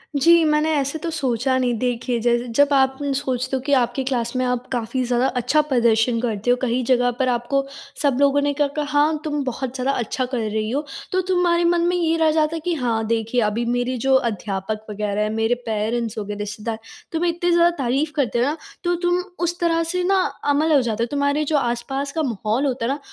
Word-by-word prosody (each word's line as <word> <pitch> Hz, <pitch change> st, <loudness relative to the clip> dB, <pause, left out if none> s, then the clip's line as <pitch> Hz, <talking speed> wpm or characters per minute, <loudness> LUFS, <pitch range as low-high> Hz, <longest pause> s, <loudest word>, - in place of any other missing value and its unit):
जी, 335 Hz, +4 st, +5 dB
मैंने 300 Hz, +1 st, +2 dB
ऐसे 280 Hz, +1 st, 0 dB
तो 335 Hz, -, -3 dB
सोचा 260 Hz, -4 st, 0 dB
नहीं। 250 Hz, -1 st, +1 dB
देखिए, 245 Hz, 0 st, -1 dB
जैसे 240 Hz, +1 st, +1 dB
जब 285 Hz, 0 st, +5 dB
आप 265 Hz, -1 st, +3 dB, 0.2 s
सोचते 260 Hz, -1 st, -2 dB
हो 260 Hz, -, -2 dB
कि 285 Hz, +2 st, -1 dB
आपकी 245 Hz, +2 st, -1 dB
क्लास 245 Hz, -2 st, -2 dB
में 255 Hz, -, +1 dB
आप 250 Hz, 0 st, -2 dB
काफ़ी 250 Hz, +1 st, -1 dB
ज़्यादा 245 Hz, +1 st, +1 dB
अच्छा 255 Hz, +6 st, +3 dB
प्रदर्शन 235 Hz, -4 st, +2 dB
करते 225 Hz, -2 st, -2 dB
हो, -, -, +5 dB
कहीं 250 Hz, 0 st, 0 dB
जगह 245 Hz, 0 st, +3 dB
पर 260 Hz, -, +2 dB
आपको 245 Hz, +3 st, 0 dB, 0.4 s
सब 280 Hz, -4 st, +2 dB
लोगों 280 Hz, 0 st, +4 dB
ने 285 Hz, 0 st, +1 dB
क 290 Hz, -, +4 dB
कहा, 300 Hz, -, 0 dB
"हाँ, 295 Hz, +1 st, +2 dB
तुम 295 Hz, -2 st, -2 dB
बहुत 255 Hz, 0 st, -4 dB
ज़्यादा 260 Hz, +1 st, 0 dB
अच्छा 245 Hz, +2 st, -2 dB
कर 250 Hz, 0 st, -4 dB
रही 215 Hz, 0 st, -1 dB
हो।" 285 Hz, +5 st, -2 dB, 0.3 s
तो 370 Hz, -, +2 dB
तुम्हारे 350 Hz, -2 st, +2 dB
मन 345 Hz, -, +1 dB
में 355 Hz, -, +1 dB
ये 330 Hz, -2 st, +1 dB
रह 320 Hz, -1 st, +3 dB
जाता 310 Hz, +1 st, +1 dB
है -, -, -3 dB
कि 355 Hz, -, +1 dB
हाँ, 235 Hz, -6 st, -1 dB
देखिए, 230 Hz, +2 st, 0 dB
अभी 230 Hz, +3 st, -2 dB
मेरी 245 Hz, +1 st, -1 dB
जो 270 Hz, -, +4 dB
अध्यापक 215 Hz, -3 st, -2 dB
वग़ैरह 210 Hz, 0 st, -2 dB
हैं, 210 Hz, -, 0 dB
मेरे 225 Hz, +2 st, +1 dB
पेरेंट्स 225 Hz, +1 st, -2 dB
हो 215 Hz, -, -2 dB
गए, 210 Hz, +1 st, -5 dB
रिश्तेदार, 210 Hz, +2 st, -5 dB, 0.3 s
तुम्हें 340 Hz, +1 st, +1 dB
इतनी 345 Hz, +1 st, -1 dB
ज़्यादा 340 Hz, 0 st, +5 dB
तारीफ़ 275 Hz, +3 st, 0 dB
करते 250 Hz, -6 st, 0 dB
हो 240 Hz, -, +3 dB
ना, 295 Hz, +4 st, -1 dB, 0.3 s
तो 350 Hz, 0 st, +1 dB
तुम 350 Hz, 0 st, +2 dB, 0.2 s
उस 345 Hz, +1 st, -1 dB
तरह 330 Hz, -1 st, +2 dB
से 360 Hz, 0 st, -1 dB
ना 380 Hz, +1 st, +3 dB, 0.3 s
अमल 310 Hz, +3 st, +2 dB
हो 275 Hz, -, +5 dB
जाते 230 Hz, -2 st, -1 dB
हो। -, -, -1 dB
तुम्हारे 285 Hz, +1 st, +1 dB
जो 305 Hz, -, +4 dB
आसपास 270 Hz, +2 st, -2 dB
का 320 Hz, +1 st, -1 dB
माहौल 230 Hz, +1 st, -1 dB
होता 255 Hz, -4 st, -1 dB
है 245 Hz, -, 0 dB
ना, 280 Hz, -, -2 dB
260 Hz, 225 wpm, -22 LUFS, 235-300 Hz, 0.4 s, जी